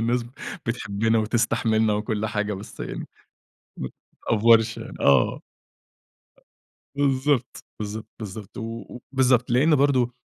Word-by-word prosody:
الناس 120 +1 +1 0.4
بتحبنا 110 -1 0
وتستحملنا 110 0 +2
وكل 105 0 -1
حاجة 105 -1 -1
بس 100 +2 -10
يعني - - -5 1.2
متأفورش 115 0 +4 0.2
آه. 70 -1 +4 1.6
بالضبط، 140 -1 +1
بالضبط، 105 +1 -5
بالضبط، 105 +1 -8
و 115 +2 -6
بالضبط، 125 -2 +3
لأنه 145 +6 +4
برضه 130 -3 +2
115 Hz, 95 wpm, -24 LUFS, 110-125 Hz, 1.6 s, متأفورش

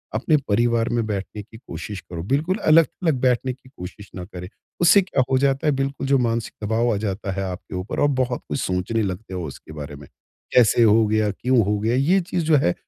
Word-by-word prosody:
अपने 150 +7 +2
परिवार 115 +2 +2
में 120 -1 0
बैठने 105 0 -4
की 110 +2 -15
कोशिश 105 -4 -7
करो, 85 -1 -7
बिल्कुल 150 - 0
अलग-अलग 165 -2 +3
बैठने 130 0 +1
की 130 0 -19
कोशिश 100 -3 -10
ना 90 - -6
करें। 90 -2 -9 0.3
उससे 180 +4 +7
क्या 140 -8 0
हो 130 - +4
जाता 135 +2 +1
है - - +5
बिल्कुल 135 0 -2
जो 140 0 +4
मानसिक 115 -2 -1
दबाव 115 +2 +1
आ 100 - -1
जाता 100 -1 -3
है 95 +1 -3
आपके 90 +1 -8
ऊपर 90 +3 -4
और 145 - +5
बहुत 125 -1 -2
कुछ - - -2
सोचने 95 +5 -1
लगते 95 +1 -5
हो 90 -1 -4
उसके 70 - -11
बारे 75 -1 -7
में, 70 -1 -13 0.5
कैसे 120 -1 +5
हो 110 0 +5
गया? 110 0 +1
क्यों 125 +5 +1
हो 105 +1 0
गया? 110 +3 0
ये 155 +9 +3
चीज़ 175 0 -2
जो 155 -1 +4
है 90 -10 +2
115 Hz, 220 wpm, -22 LUFS, 100-135 Hz, 0.5 s, उससे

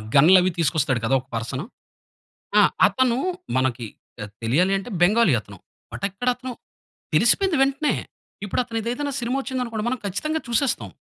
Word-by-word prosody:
గన్‌లవి 180 +6 +6
తీసుకొస్తాడు 150 -5 +1
కదా! 135 +4 +2
ఒక 130 - -30
పర్సను. 130 +7 -4 0.9
ఆ! - - +8 0.3
అతను 255 -2 +1 0.4
మనకి 130 -2 0 0.3
పెద్ 105 -3 -8
తెలియాలి 170 +12 +2
అంటే 195 +5 -7
బెంగాలీ 200 - +4
అతను. 100 -1 -13 0.3
బట్ - - -8
ఎక్కడ 200 +6 -7
అతను 255 +1 -7 0.6
తెలిసిపోయింది 385 -5 +3
వెంటనే. 275 +2 +1 0.5
ఇప్పుడు 205 - -1
అతను 230 -2 -4
ఏదైనా 260 +5 -3
సినిమా 245 +3 -1
వచ్చింది 260 -1 -4
అనుకోండి, 225 -3 -4
మనం 255 0 -1
ఖచ్చితంగా 305 - -2
చూసేస్తాం. 240 +3 0
205 Hz, 145 wpm, -23 LUFS, -, 0.9 s, ఆ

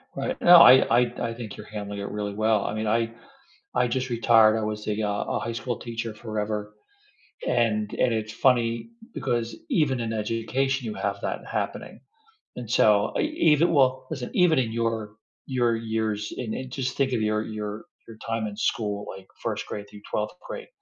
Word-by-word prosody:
Right, 260 +1 -3
no, 175 0 +9
I 125 -6 +8
I 120 -1 -2
I - - -4
think 115 -4 -7
you're 105 - -10
handling 105 -1 -5
it 100 - -4
really 105 -1 -4
well. 110 0 +1
I - - -2
mean, 110 0 -2
I 115 +1 +1 0.6
I 125 0 +2
just 130 +2 -2
retired, 115 -2 +5
I 110 - -1
was 105 0 -4
a, 105 0 -1
uh 105 -1 -1
a - - -1
high 115 - -4
school 120 0 -3
teacher 115 -1 -5
forever 105 -1 -4 0.7
and, 110 -4 +1
and 125 -2 +2
it's 110 -1 -3
funny 115 - +2 0.2
because 115 -1 -2
even 135 -6 +2
in 115 -1 -2
education 115 +5 -1
you 110 - -4
have 100 0 -2
that - - -4
happening - - -4 0.6
and 120 -3 -7
so 105 -3 +4
e - - +2 0.3
even 165 +4 +3
well, 130 -3 +3
listen, 135 -6 -4
even 175 -4 +4
in 120 -4 +1
your 115 -2 -2 0.3
your 120 -3 +1
years 110 -2 -2
and 115 -3 -4
and 130 0 -6
just 130 -1 -3
think 135 -2 +1
of 115 - 0
your 110 0 +1
your 105 0 -5 0.2
your 110 -1 -12
time 115 -1 -1
in 105 - -5
school, 105 -2 -1
like 95 -1 -13 0.2
1st - - -3
grade 105 -1 -6
through 105 - -13
12th 105 0 -2
grade, - - -7
115 Hz, 190 wpm, -26 LUFS, 105-125 Hz, 0.7 s, no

